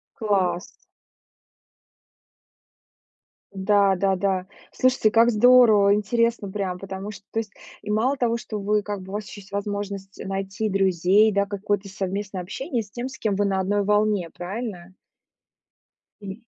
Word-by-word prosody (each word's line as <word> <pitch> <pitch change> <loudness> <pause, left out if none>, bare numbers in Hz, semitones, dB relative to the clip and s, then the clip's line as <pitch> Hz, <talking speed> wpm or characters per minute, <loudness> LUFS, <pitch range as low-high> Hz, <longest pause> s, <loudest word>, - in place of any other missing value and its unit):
Класс. 190 -4 0 2.9
Да 200 0 +3
да 195 +1 +1
да, 190 -1 -1 0.3
слушайте, 255 -4 +2
как 230 +2 +4
здорово, 220 -3 +6
интересно 230 0 0
прям. 190 -3 -3
Потому 190 +1 -7
что 200 -1 -13
то 225 - -1
есть 215 -3 -5 0.3
и 210 - -9
мало 225 +6 +1
того, 235 -3 0
что 215 -2 -6
вы 210 +1 +1
как 205 -1 -5
бы, 185 - -11
у - - -8
вас 210 0 -3
ещё 205 - -10
есть 195 - -18
возможность 200 -1 -5
найти 195 +2 -3
друзей, 195 +2 +3
да, 200 0 +1
какое-то 205 0 -2
совместное 195 0 -4
общение 235 +5 -3
с 200 - -19
тем, 240 +4 -4
с 260 - -10
кем 210 -3 -1
вы 205 +1 +1
на 195 -1 0
одной 200 +2 +1
волне, 210 -3 +1
правильно? 185 0 -6 1.3
М. 195 +2 -8
200 Hz, 150 wpm, -24 LUFS, 195-215 Hz, 2.9 s, здорово